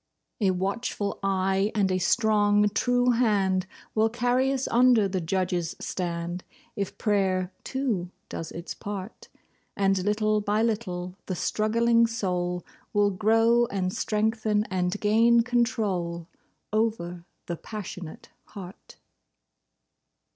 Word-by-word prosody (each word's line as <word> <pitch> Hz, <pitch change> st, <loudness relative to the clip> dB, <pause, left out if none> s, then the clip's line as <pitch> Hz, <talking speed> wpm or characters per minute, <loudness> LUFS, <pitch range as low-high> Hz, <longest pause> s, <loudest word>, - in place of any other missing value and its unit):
A 200 Hz, -4 st, +3 dB
watchful 200 Hz, +2 st, -2 dB
eye 195 Hz, +1 st, +1 dB
and 195 Hz, -3 st, +2 dB
a 185 Hz, -, +1 dB
strong, 210 Hz, 0 st, +3 dB
true 245 Hz, +3 st, +2 dB
hand 195 Hz, -6 st, +2 dB, 0.3 s
Will 220 Hz, +1 st, +3 dB
carry 245 Hz, +3 st, +1 dB
us 270 Hz, -1 st, -1 dB
under 240 Hz, -3 st, +5 dB
the 190 Hz, -1 st, -2 dB
Judge's 175 Hz, -1 st, -1 dB
stand, 175 Hz, 0 st, -3 dB, 0.3 s
If 200 Hz, -2 st, -4 dB
prayer, 190 Hz, -3 st, +1 dB
too, 235 Hz, -10 st, -2 dB, 0.2 s
does 165 Hz, -, -6 dB
its 170 Hz, +1 st, -6 dB
part; 200 Hz, 0 st, -7 dB, 0.5 s
And 195 Hz, -2 st, +2 dB
little 215 Hz, +1 st, +1 dB
by 210 Hz, +2 st, +1 dB
little 185 Hz, -5 st, -2 dB
the 185 Hz, -, -2 dB
struggling 230 Hz, +4 st, +2 dB
soul 180 Hz, -6 st, -2 dB, 0.3 s
Will 205 Hz, -1 st, +3 dB
grow 225 Hz, +4 st, +3 dB
and 185 Hz, -3 st, -2 dB
strengthen 215 Hz, 0 st, 0 dB
and 185 Hz, +1 st, -1 dB
gain 230 Hz, +3 st, +4 dB
control 210 Hz, -9 st, -1 dB, 0.5 s
Over 195 Hz, -6 st, -1 dB, 0.2 s
the 170 Hz, -, -4 dB
passionate 185 Hz, -6 st, -8 dB, 0.2 s
heart. 190 Hz, -3 st, -11 dB
205 Hz, 115 wpm, -26 LUFS, 185-225 Hz, 0.5 s, under